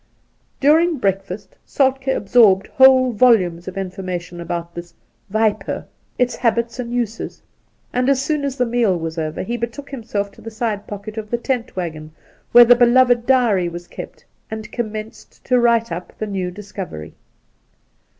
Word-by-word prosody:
During 320 Hz, +3 st, +4 dB
breakfast 195 Hz, -2 st, -3 dB
Soltkd 265 Hz, -1 st, +1 dB
absorbed 200 Hz, -2 st, +4 dB
whole 260 Hz, -1 st, +5 dB
volumes 195 Hz, -7 st, +3 dB
of 185 Hz, -, -6 dB
infor 195 Hz, 0 st, -5 dB
mation 175 Hz, -1 st, -5 dB
about 170 Hz, 0 st, -5 dB
this 170 Hz, -1 st, -9 dB, 0.2 s
' -, -, -32 dB
wiper 220 Hz, -2 st, 0 dB
' -, -, -42 dB
— -, -, -42 dB
its 250 Hz, -1 st, 0 dB
habits 235 Hz, 0 st, 0 dB
and 240 Hz, -1 st, -4 dB
uses; 235 Hz, -2 st, -4 dB, 0.5 s
and 250 Hz, +2 st, +1 dB
as 275 Hz, -2 st, +3 dB
soon 295 Hz, +1 st, -1 dB
as 275 Hz, -1 st, -3 dB
the 250 Hz, -, +2 dB
meal 230 Hz, -6 st, +1 dB
was 165 Hz, 0 st, -4 dB
over 155 Hz, +2 st, -3 dB
he 235 Hz, +5 st, -3 dB
betook 235 Hz, +5 st, -6 dB
him 265 Hz, -5 st, -6 dB
self 200 Hz, -2 st, -3 dB
to -, -, -17 dB
the 225 Hz, -, -7 dB
side 215 Hz, -2 st, -3 dB
pocket 210 Hz, +2 st, -6 dB
of 210 Hz, -1 st, -8 dB
the 240 Hz, -, 0 dB
tent 245 Hz, -1 st, -3 dB
waggon, 155 Hz, -4 st, -5 dB, 0.4 s
where 240 Hz, 0 st, +9 dB
the 245 Hz, -, +8 dB
beloved 245 Hz, 0 st, +4 dB
diary 230 Hz, -9 st, +3 dB
was 175 Hz, +1 st, -8 dB
kept, -, -, -10 dB, 0.2 s
and 220 Hz, -1 st, -7 dB
commenced 220 Hz, -2 st, -7 dB
to 250 Hz, -1 st, +3 dB
write 235 Hz, -1 st, +2 dB
up 175 Hz, +2 st, -7 dB
the 215 Hz, -, -3 dB
new 190 Hz, -3 st, -3 dB
discovery. 190 Hz, -, -8 dB
220 Hz, 175 wpm, -20 LUFS, 185-245 Hz, 0.5 s, where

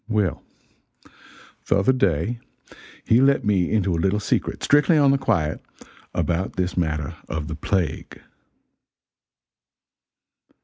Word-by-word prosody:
Well, 105 Hz, -5 st, 0 dB, 1.3 s
the -, -, +3 dB
other 100 Hz, +7 st, +3 dB
day 100 Hz, -, 0 dB, 0.7 s
he 115 Hz, +3 st, +4 dB
let 140 Hz, +1 st, +3 dB
me 95 Hz, -4 st, +1 dB
into 100 Hz, -4 st, +1 dB
a 80 Hz, -, -1 dB
little 95 Hz, +4 st, +1 dB
secret, 105 Hz, -, -2 dB
strictly 150 Hz, +3 st, +4 dB
on 140 Hz, -2 st, +5 dB
the 140 Hz, -, +1 dB
quiet, 80 Hz, -, -1 dB, 0.5 s
about 85 Hz, +3 st, -1 dB
this 90 Hz, -1 st, -2 dB
matter 80 Hz, -2 st, -2 dB
of 75 Hz, -1 st, -4 dB
the -, -, -5 dB
plague. 85 Hz, -1 st, -3 dB
95 Hz, 120 wpm, -23 LUFS, 85-120 Hz, 1.3 s, on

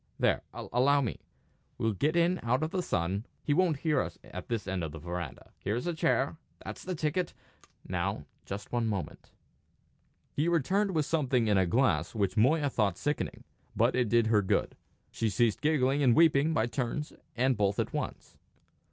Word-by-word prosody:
There -, -, +2 dB
allow 140 Hz, +4 st, +2 dB
me. 120 Hz, -7 st, -3 dB, 0.6 s
We'll 115 Hz, -1 st, 0 dB
get 150 Hz, -, 0 dB
in 175 Hz, +2 st, +3 dB
out 125 Hz, +5 st, +1 dB
of 160 Hz, -, -2 dB
the 185 Hz, -, 0 dB
sun; 95 Hz, -, -1 dB, 0.2 s
he 145 Hz, -, +1 dB
won't 165 Hz, -3 st, +2 dB
hear 150 Hz, -5 st, +2 dB
us -, -, -5 dB
at -, -, -8 dB
this 115 Hz, -4 st, -3 dB
end 95 Hz, -2 st, -2 dB
of 80 Hz, -, -3 dB
the -, -, -6 dB
verandah. 85 Hz, -2 st, -6 dB
Here's 110 Hz, -, -2 dB
a 175 Hz, -, 0 dB
chair. 160 Hz, -3 st, +1 dB, 0.3 s
That's -, -, -7 dB
the 185 Hz, -1 st, -3 dB
ticket! 160 Hz, +3 st, -1 dB, 0.5 s
Now, -, -, -2 dB, 0.2 s
just 100 Hz, +1 st, -7 dB
one 120 Hz, -2 st, 0 dB
moment." 100 Hz, -4 st, -4 dB, 1.0 s
He 150 Hz, +4 st, 0 dB
returned 185 Hz, +4 st, +1 dB
with 155 Hz, -2 st, +2 dB
something 135 Hz, -7 st, +1 dB
in 105 Hz, -2 st, +4 dB
a 95 Hz, -, +2 dB
glass 125 Hz, +5 st, +1 dB
which 100 Hz, -3 st, 0 dB
Moya 145 Hz, +7 st, +3 dB
thought 100 Hz, -7 st, +1 dB
sickening. 145 Hz, 0 st, -2 dB, 0.3 s
But -, -, +3 dB
it 125 Hz, -3 st, +1 dB
did 115 Hz, +1 st, +4 dB
her 110 Hz, -2 st, +4 dB
good. 95 Hz, -, 0 dB, 0.4 s
She 115 Hz, -, -1 dB
ceased 110 Hz, +3 st, +1 dB
giggling 145 Hz, -2 st, +2 dB
and 125 Hz, -4 st, +5 dB
weeping 160 Hz, -2 st, +5 dB
by 115 Hz, -8 st, +2 dB
turns 135 Hz, +4 st, -3 dB, 0.2 s
and 130 Hz, +2 st, +2 dB
both 100 Hz, -1 st, +1 dB
at -, -, -1 dB
once. -, -, -5 dB
130 Hz, 180 wpm, -30 LUFS, 105-155 Hz, 1.0 s, and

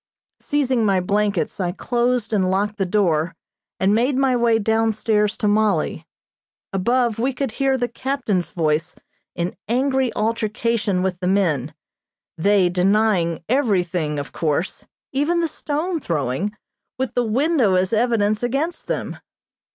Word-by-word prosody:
Seizing 265 Hz, -5 st, 0 dB
my 195 Hz, -3 st, +3 dB
blankets 200 Hz, +1 st, 0 dB
I 180 Hz, -2 st, 0 dB
closed 240 Hz, +1 st, 0 dB
and 190 Hz, -3 st, +2 dB
locked 205 Hz, +2 st, 0 dB
the 195 Hz, -, +1 dB
door 175 Hz, -5 st, +1 dB, 0.4 s
and 190 Hz, +2 st, +3 dB
made 250 Hz, +5 st, +2 dB
my 265 Hz, -2 st, +3 dB
way 235 Hz, -2 st, +3 dB
down 225 Hz, +1 st, +1 dB
stairs 210 Hz, -1 st, +1 dB
to 210 Hz, -, 0 dB
Mollie. 205 Hz, -5 st, +1 dB, 0.7 s
Above 235 Hz, +3 st, +1 dB
we 260 Hz, +3 st, 0 dB
could 265 Hz, -1 st, -2 dB
hear 270 Hz, +2 st, +1 dB
the 245 Hz, -1 st, 0 dB
captain's 240 Hz, -7 st, -2 dB
voice 160 Hz, -2 st, -1 dB, 0.4 s
in 175 Hz, +1 st, -2 dB
angry 260 Hz, +1 st, +1 dB
altercation 215 Hz, -2 st, 0 dB
with 185 Hz, -2 st, -2 dB
the 180 Hz, -, -2 dB
men, 180 Hz, -9 st, +1 dB, 0.6 s
they 195 Hz, +2 st, +3 dB
denying 180 Hz, -2 st, +1 dB
everything, 180 Hz, -, 0 dB
of 145 Hz, 0 st, -5 dB
course, 160 Hz, +3 st, -2 dB, 0.2 s
even 295 Hz, +6 st, +1 dB
the 335 Hz, -, +1 dB
stone 315 Hz, +3 st, -2 dB
throwing, 155 Hz, -, -2 dB, 0.5 s
with 255 Hz, -2 st, -2 dB
the 245 Hz, -, +1 dB
window 245 Hz, -, +2 dB
as 185 Hz, +3 st, +1 dB
evidence 215 Hz, -2 st, +2 dB
against 275 Hz, +8 st, -2 dB
them. -, -, -3 dB
215 Hz, 140 wpm, -21 LUFS, 185-245 Hz, 0.7 s, my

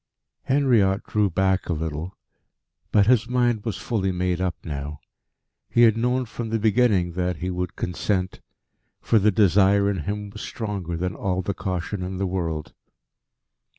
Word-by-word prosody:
Henriot 120 Hz, -8 st, +3 dB
drew 105 Hz, -2 st, +1 dB
back 95 Hz, +1 st, 0 dB
a -, -, +2 dB
little. 80 Hz, +3 st, -4 dB, 0.7 s
But 100 Hz, -2 st, +5 dB
his 120 Hz, 0 st, +3 dB
mind 120 Hz, -4 st, +1 dB
was 110 Hz, -4 st, -3 dB
fully 100 Hz, -5 st, -1 dB
made 90 Hz, 0 st, -1 dB
up 90 Hz, -2 st, 0 dB
now. 75 Hz, -1 st, -5 dB, 0.7 s
He 120 Hz, -, +4 dB
had 110 Hz, -2 st, +6 dB
known 125 Hz, +2 st, 0 dB
from 115 Hz, 0 st, -6 dB
the 115 Hz, -, +1 dB
beginning 105 Hz, -4 st, +2 dB
that 90 Hz, +1 st, -1 dB
he 90 Hz, +3 st, -3 dB
would 90 Hz, -1 st, -3 dB
consent, 95 Hz, +1 st, -2 dB, 0.6 s
for 115 Hz, -, +3 dB
the 105 Hz, +2 st, +4 dB
desire 100 Hz, 0 st, +4 dB
in 100 Hz, -, -3 dB
him 105 Hz, 0 st, -4 dB
was 105 Hz, -, -9 dB
stronger 100 Hz, -7 st, -4 dB
than 90 Hz, +2 st, -2 dB
all 95 Hz, -1 st, -2 dB
the 100 Hz, -, -2 dB
caution 95 Hz, +1 st, -3 dB
in 90 Hz, +1 st, -4 dB
the 95 Hz, -, -1 dB
world. 80 Hz, -5 st, -3 dB
95 Hz, 160 wpm, -24 LUFS, 90-110 Hz, 0.7 s, had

